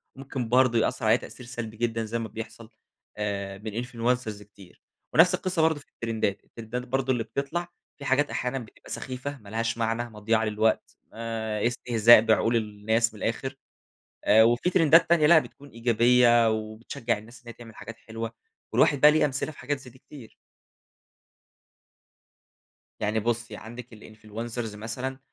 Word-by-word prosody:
وممكن 135 -3 -5
برضه 125 -2 +4
يأثِّر 120 0 -1
عليّا 110 +2 +5
تأثير 125 +1 -11
سلبي 120 -2 -7
جدًا، 115 -1 -1
زي 115 +2 -3
ما 115 - -4
بيحصل 110 +1 -9 0.5
آآ، 100 -2 -3
من 110 +3 -4
influencers 120 -3 -2
كتير. 100 -3 -18 0.3
ونفس 180 +3 +6
القصة 185 -2 -1
برضه 160 -1 +2
في 140 - -17
الترِندات، 110 -4 -2
الترِندات 120 +2 -7
برضه 130 +1 0
اللي 120 - -1
بتطلع 140 +9 -3 0.3
في 140 - -9
حاجات، 145 +2 +2
أحيانًا 125 +1 -2
بتبقى 115 -4 -13
سخيفة 130 +2 -5
ما 105 -5 -15
لهاش 115 +1 -2
معنى، 115 +1 -1
مضيِّعة 110 +1 0
للوقت، 110 +1 0 0.2
آآ، 110 -1 -2
استهزاء 120 -2 +5
بعقول 115 +1 +2
الناس 110 +1 0
من 105 - -9
الآخر، 130 +4 -2 0.7
آآ، 110 +1 +6
وفي 120 +9 +3
ترِندات 165 -1 +5
تانية 165 -3 +4
لأ 160 +1 +8
بتكون 145 -2 -7
إيجابية 120 0 +4
وبتشجِّع 110 +2 -3
الناس 115 +3 -14
إنّها 120 -1 -9
تعمل 115 -2 -13
حاجات 115 - -9
حلوة، 115 0 -6 0.4
والواحد 140 - +3
بقى 150 - +9
ليه 155 0 +3
أمثلة 140 +1 -1
في - - -19
حاجات 145 +3 -2
زي 130 -2 -13
دي 130 - -19
كتير. 130 -4 -14 2.7
يعني 105 +1 0
بُصي، 115 0 -2
عندِك 120 +1 -10
الinfluencers 110 +1 -7
مثلًا 125 +5 -5
115 Hz, 155 wpm, -26 LUFS, 110-130 Hz, 2.7 s, بقى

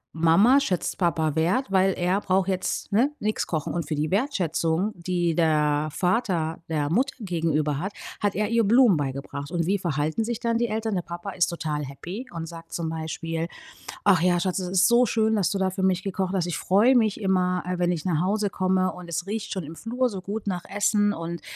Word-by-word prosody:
Mama 195 +12 +5
schätzt 190 -9 -2
Papa 160 -4 +1
Wert, 190 +9 +1
weil 190 0 +3
er 180 +3 0
braucht 190 0 +1
jetzt, 185 +2 -2
ne, 250 +8 +3
nix 215 +1 -1
kochen." 155 -3 -2
Und 170 -4 -3
für 155 - -2
die 150 +2 -1
Wertschätzung, 190 - 0
die 175 -1 -1
der 150 -2 +2
Vater 180 -5 0
der 150 -1 -1
Mutter 265 +8 +1
gegenüber 155 -6 0
hat, 195 +4 -4 0.3
hat 205 -1 0
er 210 +1 0
ihr 230 -1 +3
Blumen 230 -2 +5
beigebracht. 140 +1 -4
Und 170 -2 0
wie 195 +2 +1
verhalten 155 +4 -1
sich 235 0 -3
dann 230 0 0
die 240 - +1
Eltern? 220 0 -2
Der 180 - 0
Papa 175 +3 -7
ist 180 -1 +1
total 155 -4 -3
happy 180 - -7
und 165 -1 -5
sagt 165 0 -11
zum 165 -2 -2
Beispiel: 165 +1 -3 0.6
,,Ach 190 -5 +5
ja, 175 0 +3
Schatz, 185 +1 0
es 180 - -3
ist 185 +1 +4
so 240 +1 +5
schön, 220 -1 +1
dass 185 -4 +2
du 195 - -1
da 190 0 +2
für 190 0 -3
mich 190 0 +2
gekocht 190 -1 -2
hast. 180 -2 +1
Ich 175 - -2
freue 220 +8 +4
mich 220 -1 +1
immer, 180 -2 +1
äh, 180 0 -3
wenn 175 0 +2
ich 155 - -4
nach 165 -4 +1
Hause 205 +2 0
komme. 185 0 +1
Und 180 -1 -10
es 175 +3 -3
riecht 220 +1 -3
schon 190 -4 -3
im 160 +3 -9
Flur 245 +2 -1
so 195 -3 -6
gut 205 +3 -5
nach 180 -2 -2
Essen 205 0 +1
und 165 0 -5
185 Hz, 215 wpm, -25 LUFS, 165-205 Hz, 0.6 s, Mama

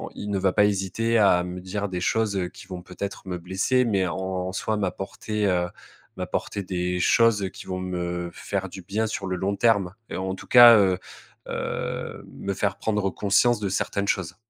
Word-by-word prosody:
il 105 - -6
ne 100 - 0
va 95 -1 +2
pas 105 - +5
hésiter 105 +3 0
à 90 -4 +5
me 90 0 -6
dire 100 +2 -4
des 90 -1 -3
choses 105 +1 +1
qui - - -13
vont 90 -2 -6
peut-être 95 +2 -6
me 90 -1 -3
blesser 95 +9 +1
mais, 100 -5 +1
en 80 - -3
en 95 -1 -3
soi 110 +3 -1
m'apporter, 105 +2 -2
heu, 90 -2 +1 0.5
m'apporter 100 - -3
des 90 -1 -2
choses 100 +2 +3
qui - - -10
vont 90 0 -4
me 90 -1 -3
faire 95 +1 -3
du 95 0 -9
bien 105 +5 -1
sur 105 -2 -4
le 95 - -1
long 95 +3 -1
terme 100 -5 +2 0.2
et - - -4
en 95 0 -2
tout - - -12
cas, 120 -2 +10
heu 95 -3 +3 0.5
heu, - - -4
me 100 - -4
faire 100 0 -1
prendre 105 -3 0
conscience 105 +3 +3
de 100 -2 -2
certaines 100 +1 -1
choses. 90 -2 -1
95 Hz, 195 wpm, -25 LUFS, 90-105 Hz, 0.5 s, cas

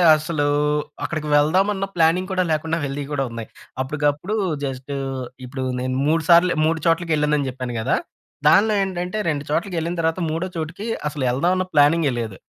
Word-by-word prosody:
అసలూ 155 -1 -1 0.6
అక్కడికి 155 -2 -3
వెళ్దామన్న 190 +7 +2
ప్లానింగ్ 175 +3 +2
కూడా 185 -1 +2
లేకుండా 160 +1 0
వెళ్ళినవి 140 0 -3
కూడా 135 -1 0
ఉన్నాయి. 115 -1 -7 0.3
అప్పటికప్పుడు 150 +8 -1 0.3
జస్ట్ 135 0 -5 0.5
ఇప్పుడు 130 +1 -5 0.2
నేను 130 0 -2
మూడు 160 +1 +2
సార్లు 175 +1 +6
మూడు 160 +1 +1
చోట్లకెళ్ళానని 150 -4 +1
చెప్పాను 125 -1 -5
కదా! 110 - +1 0.5
దాంట్లో 215 +2 +5
ఏంటంటే 180 +1 -3
రెండు 145 -2 -1
చోట్లకెళ్ళిన 170 +1 -1
తర్వాత 165 +2 0
మూడో 165 +4 -2
చోటుకి 165 +6 -5 0.2
అసలు 145 -2 -4
ఎళ్దామన్న 180 +8 +1
ప్లానింగే 145 0 +4
లేదు. 110 -5 -5
155 Hz, 145 wpm, -22 LUFS, 145-175 Hz, 0.6 s, సార్లు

